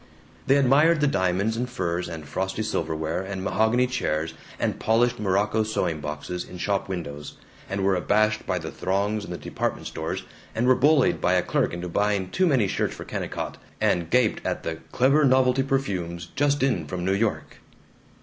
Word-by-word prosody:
They 135 Hz, -, +5 dB
admired 145 Hz, +5 st, +4 dB
the 150 Hz, -, +3 dB
diamonds 100 Hz, -2 st, +1 dB
and 125 Hz, +2 st, -2 dB
furs 85 Hz, -6 st, -2 dB
and 80 Hz, -3 st, -7 dB
frosty 95 Hz, +7 st, -2 dB
silverware 80 Hz, -1 st, -2 dB
and 95 Hz, 0 st, -5 dB
mahogany 110 Hz, +5 st, +2 dB
chairs 80 Hz, -11 st, -1 dB, 0.3 s
and -, -, -1 dB
polished 120 Hz, +2 st, +2 dB
morocco 105 Hz, +2 st, +1 dB
sewing 105 Hz, -7 st, -1 dB
boxes 75 Hz, +4 st, -4 dB
in 90 Hz, -, -10 dB
shop 100 Hz, +2 st, -1 dB
windows, 75 Hz, -6 st, -6 dB, 0.3 s
and 100 Hz, 0 st, -2 dB
were 95 Hz, 0 st, +3 dB
abashed 110 Hz, +4 st, +1 dB
by 90 Hz, -, 0 dB
the 80 Hz, -2 st, -5 dB
throngs 100 Hz, +3 st, -1 dB
in -, -, -10 dB
the 90 Hz, -, -4 dB
department -, -, -3 dB
stores, -, -, -4 dB, 0.3 s
and 115 Hz, -, +1 dB
were 130 Hz, -, +6 dB
bullied 140 Hz, +1 st, +3 dB
by 90 Hz, -, +3 dB
a 90 Hz, -1 st, +3 dB
clerk -, -, 0 dB
into 85 Hz, +1 st, -5 dB
buying 100 Hz, +1 st, 0 dB
too 185 Hz, -1 st, +2 dB
many 130 Hz, -, +3 dB
shirts -, -, -1 dB
for -, -, -8 dB
Kennicott, -, -, -4 dB, 0.2 s
and 85 Hz, -2 st, +1 dB
gaped 125 Hz, -3 st, +2 dB
at -, -, -2 dB
the 80 Hz, 0 st, -3 dB
"clever 140 Hz, +4 st, +4 dB
novelty 130 Hz, -1 st, +4 dB
perfumes 90 Hz, -11 st, -2 dB
just 145 Hz, 0 st, +2 dB
in 100 Hz, -, +1 dB
from 90 Hz, +3 st, -4 dB
New 95 Hz, -, +2 dB
York." 105 Hz, +2 st, -1 dB
100 Hz, 180 wpm, -25 LUFS, 90-125 Hz, 0.3 s, were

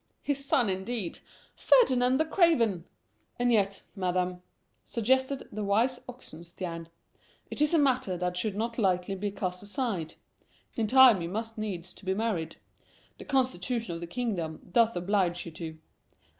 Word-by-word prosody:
His 280 Hz, -1 st, -1 dB
son, 270 Hz, -4 st, +2 dB
indeed! 190 Hz, 0 st, -3 dB, 0.4 s
Ferdinand 255 Hz, -, +4 dB
the 315 Hz, -, +2 dB
Craven!" 265 Hz, -, +3 dB, 0.5 s
"And 245 Hz, 0 st, +2 dB
yet, 200 Hz, -3 st, +1 dB
Madam," 180 Hz, -1 st, -1 dB, 0.4 s
suggested 260 Hz, +4 st, 0 dB
the 210 Hz, 0 st, -4 dB
wise 230 Hz, +6 st, +2 dB
Oxenstiern, 170 Hz, -7 st, -7 dB, 0.6 s
"it -, -, -5 dB
is 300 Hz, +2 st, +3 dB
a -, -, +5 dB
matter 255 Hz, -, +2 dB
that 180 Hz, 0 st, -2 dB
should 200 Hz, +2 st, -1 dB
not 230 Hz, +3 st, -2 dB
lightly 185 Hz, -2 st, +1 dB
be 200 Hz, +2 st, -2 dB
cast 185 Hz, -2 st, -3 dB
aside. 205 Hz, -, -3 dB, 0.6 s
In 225 Hz, -2 st, -1 dB
time 250 Hz, -5 st, +7 dB
you 170 Hz, -, -3 dB
must 225 Hz, +3 st, -4 dB
needs 190 Hz, -5 st, -5 dB
be 190 Hz, -1 st, -3 dB
married. 190 Hz, -7 st, -2 dB, 0.6 s
The -, -, -9 dB
constitution 250 Hz, -6 st, 0 dB
of 165 Hz, -, -6 dB
the 170 Hz, -, -5 dB
kingdom 175 Hz, -7 st, -3 dB
doth 230 Hz, +3 st, +4 dB
oblige 180 Hz, -1 st, 0 dB
you 170 Hz, -, -7 dB
to." 160 Hz, 0 st, -7 dB
205 Hz, 145 wpm, -29 LUFS, 180-245 Hz, 0.6 s, time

